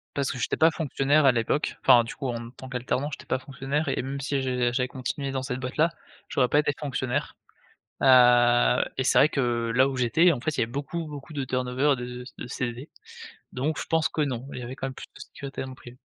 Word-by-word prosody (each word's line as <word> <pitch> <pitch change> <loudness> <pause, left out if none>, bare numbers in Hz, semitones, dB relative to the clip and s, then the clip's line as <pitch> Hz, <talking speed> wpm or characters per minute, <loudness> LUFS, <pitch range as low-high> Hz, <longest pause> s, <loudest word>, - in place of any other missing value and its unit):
Parce 140 -2 0
que - - -6
j'étais 125 - -1
pas 160 +1 +5
fonctionnaire 150 -1 +1
à 135 - +7
l'époque, 120 +5 -1
enfin, 125 -3 +6
du 115 - -8
coup 135 - -4
en 120 -1 -4
tant 130 +1 -11
qu'alternant, 130 +2 -2
j'étais - - -8
pas 130 - -1
fonctionnaire 135 +3 -3
et 135 - 0
même 135 +2 -5
si 140 0 -1
je 125 -2 0
j'avais 125 0 0
continué 135 +2 -4
dans 135 -1 -2
cette 130 -1 -4
boîte-là, 150 +6 +1 0.4
j'aurais 125 -3 +1
pas 145 - +4
été 150 -1 +1
fonctionnaire. 130 -4 -3 0.7
Heu 120 -2 +6
et 130 - +1
c'est - - +3
vrai 150 - +6
que, 120 -5 0
là 130 +1 +5
où 135 - -4
j'étais, 125 +9 +4
en 140 - -2
fait, 145 +4 -2
il - - -1
y - - +4
avait 115 - -6
beaucoup, 145 +5 -4
beaucoup 145 +1 -9
de 140 -2 -2
turnover 130 +2 +1
de 125 0 -6
de - - -7
CV, 125 +2 -4 0.6
donc 150 +5 -1
je - - -4
pense 160 -1 +2
que 155 - -2
non, 130 -3 -2
il - - -6
y 125 - -6
avait 125 +2 -6
quand 135 - -5
même 135 - -6
plus - - -9
de - - -13
sécurité 140 -1 -8
dans 130 - -7
le 130 - -9
privé. 120 -1 -13
130 Hz, 240 wpm, -26 LUFS, 125-140 Hz, 0.7 s, à